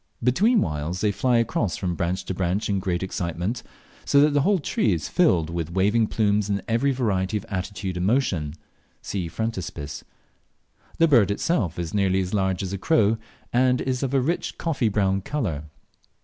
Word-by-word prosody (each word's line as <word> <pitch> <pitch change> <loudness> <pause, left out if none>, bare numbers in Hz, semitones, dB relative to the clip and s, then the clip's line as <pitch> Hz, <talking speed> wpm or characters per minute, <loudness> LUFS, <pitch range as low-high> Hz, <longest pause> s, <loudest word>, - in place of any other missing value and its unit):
Between 205 - +3
whiles 75 +4 -2
they 105 - +2
fly 120 +5 +2
across 115 -5 0
from 90 -2 -2
branch 85 +3 -2
to - - -3
branch 95 +4 -1
in 100 -1 +1
great 90 -1 -1
excitement, 90 +5 -3 0.4
so 140 - +4
that 150 +1 +5
the 145 0 +2
whole 200 +7 +3
tree 115 - +1
is 80 -4 -3
filled 85 -3 +2
with 85 -1 -3
waving 105 +4 +2
plumes 105 -2 +1
in 100 0 -1
every 115 +4 +2
variety 105 -6 0
of 100 - -7
attitude 95 -1 -4
and 90 +1 0
motion. 90 - 0 0.5
(See 95 -4 -3
Frontispiece.) 85 -7 -4 0.9
The 165 - +5
bird 120 - +5
itself 100 - 0
is 85 -2 -4
nearly 95 -2 +2
as 95 0 -2
large 95 -2 0
as 95 0 -4
a 100 - -3
crow, 110 -5 +3 0.3
and 125 +1 +3
is 130 -1 -1
of 135 0 -1
a - - +5
rich 165 +7 -2
coffee 140 -9 0
brown 95 -2 +1
colour. 95 - -3
100 Hz, 180 wpm, -24 LUFS, 90-120 Hz, 0.9 s, that